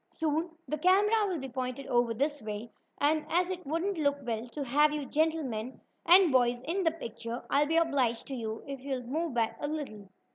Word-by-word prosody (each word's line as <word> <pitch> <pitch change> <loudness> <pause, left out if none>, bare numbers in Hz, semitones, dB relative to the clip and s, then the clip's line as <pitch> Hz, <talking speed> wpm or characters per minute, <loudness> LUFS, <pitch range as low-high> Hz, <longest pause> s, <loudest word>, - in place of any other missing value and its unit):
Soon 320 +2 -1 0.2
the 305 +3 -2
camera 410 +5 +4
will 365 -3 -1
be 270 -2 -5
pointed 255 +1 -4
over 240 -2 +2
this 290 +3 -1
way, 215 +2 -6 0.3
and 305 +1 +2
as 355 +2 +2
it 365 -5 -6
wouldn't 335 +4 -1
look 285 -1 +2
well 230 -1 -3
to 290 +3 -4
have 295 +4 +3
you 300 -2 -3
gentlemen 280 -7 -1 0.3
and 355 -1 +8
boys 245 -1 +2
in 335 +8 -1
the 335 - +3
picture, 235 -5 -6
I'll 290 +1 +4
be 325 +2 +2
obliged 270 -8 +1
to - - -4
you 225 -3 -4
if 275 -1 -6
you'll 265 -1 -4
move 300 +3 -2
back 230 -2 0
a 290 - -2
little." 265 -10 -5
285 Hz, 205 wpm, -30 LUFS, 245-325 Hz, 0.3 s, and